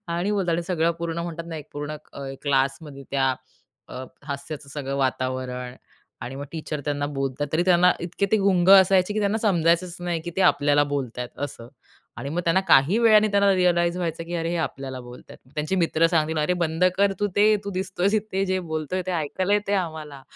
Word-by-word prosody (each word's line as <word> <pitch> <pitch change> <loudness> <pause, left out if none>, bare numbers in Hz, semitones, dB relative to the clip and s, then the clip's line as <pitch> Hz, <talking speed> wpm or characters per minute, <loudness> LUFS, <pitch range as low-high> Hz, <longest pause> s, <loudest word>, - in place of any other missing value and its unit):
आणि 170 +4 -1
बोलतात 175 -5 0
सगळं 170 -2 +2
पूर्ण 170 0 -3
म्हणतात 170 -1 -5
ना, 165 -1 -6
एक 150 -1 -9
पूर्ण 145 +1 -5 0.2
अ, 140 - -8 0.2
क्लासमध्ये 140 +1 -1
त्या 135 -1 +1 0.5
अ, 130 +1 -7 0.2
हास्याचं 140 0 -6
सगळं 140 -1 -5
वातावरण 130 -1 -2 0.5
आणि 125 - -6
मग 140 - -5
टीचर 155 -2 -4
त्यांना 145 -1 -1
बोलतात 135 +1 -2
तरी 160 +2 +2
त्यांना 180 0 +5
इतके 175 +3 -2
ते - - +6
गुंग 190 -3 +2
असायचे, 190 0 +6
की 215 - 0
त्यांना 205 +1 +1
समजायचंच 175 -4 +1
नाही, 175 -2 -2
की 175 +2 -6
ते - - 0
आपल्याला 145 -4 +4
बोलतात 125 -3 -3 0.2
असं 120 -4 -12 0.5
आणि 140 - -5
मग 170 +4 -1
त्यांना 170 +3 +3
काही 160 +8 +5
वेळाने 215 -2 +5
त्यांना 200 0 +4
रिअलाईज 175 -1 +2
व्हायचं, 165 -2 -3
की 170 +1 -6
अरे 165 -1 -1
हे 175 - -1
आपल्याला 135 -4 -4
बोलतात. 125 0 -12
त्या 130 - -27
त्यांचे 155 +5 -1
मित्र 165 -2 +3
सांगतील, 160 -2 0
"अरे, 150 +4 +1
बंद 160 +2 0
कर 200 0 +3
तू 205 - +2
ते, 210 +1 +5
तू 200 - -4
दिसतोयस 190 +1 -1
इथे, 205 -2 0
जे 185 0 0
बोलतोय 160 +4 -2
ते - - -2
ऐकायला 175 +4 -1
येते 205 -1 -1
आम्हाला," 155 -4 -9
165 Hz, 195 wpm, -24 LUFS, 145-185 Hz, 0.5 s, ते